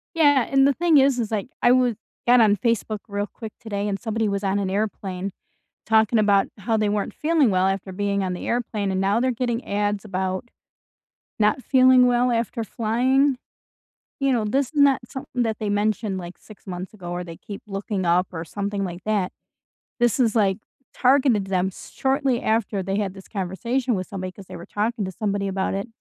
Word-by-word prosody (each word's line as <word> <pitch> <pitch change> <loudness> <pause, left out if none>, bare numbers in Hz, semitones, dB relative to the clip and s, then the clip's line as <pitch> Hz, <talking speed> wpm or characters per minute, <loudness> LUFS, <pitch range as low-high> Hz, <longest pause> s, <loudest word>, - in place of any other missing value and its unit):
Yeah, 285 -6 +4
and 270 0 +5
the 280 - +3
thing 335 -1 +3
is, 270 -2 +4
is, 225 -2 -2
like, 210 0 -1
I 240 - +5
wa 250 -2 +4 0.3
got 245 0 +7
on 210 -2 +5
Facebook 220 -1 -1
real 205 0 -2
quick 220 -3 -8
today, 205 -3 -3
and 195 -1 -2
somebody 225 -1 -1
was 200 0 -2
on 195 +1 +1
an 195 -2 -1
airplane 195 -2 -3 0.6
talking 220 0 +4
about 200 -2 +4
how 220 +3 0
they 215 -1 +1
weren't 205 0 -1
feeling 305 -5 +2
well 185 -1 +2
after 195 0 -2
being 200 +1 -1
on 185 -1 -2
the - - -6
airplane, 220 -4 -1
and 190 - 0
now 200 +3 +2
they're 255 +1 +2
getting 240 0 -2
ads 205 0 -1
about 190 +2 -3 0.9
not 215 +4 +2
feeling 255 -1 +5
well 245 0 +3
after 230 0 -1
flying, 255 +5 +1 0.8
you 275 -1 +2
know, 230 -3 +1
this 265 +5 +1
is 295 -1 0
not 275 -2 +5
something 250 -2 -3
that 220 -2 -1
they 215 - -2
mentioned, 205 -1 0
like, 175 0 -8
6 215 - -16
months 185 +2 -6
ago 175 -4 -8
or 175 0 -3
they 165 -1 -9
keep 200 -1 -9
looking 195 0 -3
up 175 +2 +3
or 165 -1 -4
something 200 +3 -3
like 180 -1 -6
that, 205 -4 0 0.7
this 240 +2 +2
is, 235 -3 +2
like, 195 -3 +3 0.4
targeted 255 -5 +3
them 190 0 0
shortly 265 +4 -1
after 215 -3 0
they 195 +2 -2
had 200 -3 -1
this 195 - -12
conversation 235 +6 -1
with 185 -1 -3
somebody, 185 -3 -5
'cause 195 +1 -13
they - - -10
were 170 - -9
talking 215 +1 -2
to 190 - -5
somebody 200 0 -2
about 190 0 -1
it, 195 +4 -3
210 Hz, 200 wpm, -23 LUFS, 195-245 Hz, 0.9 s, got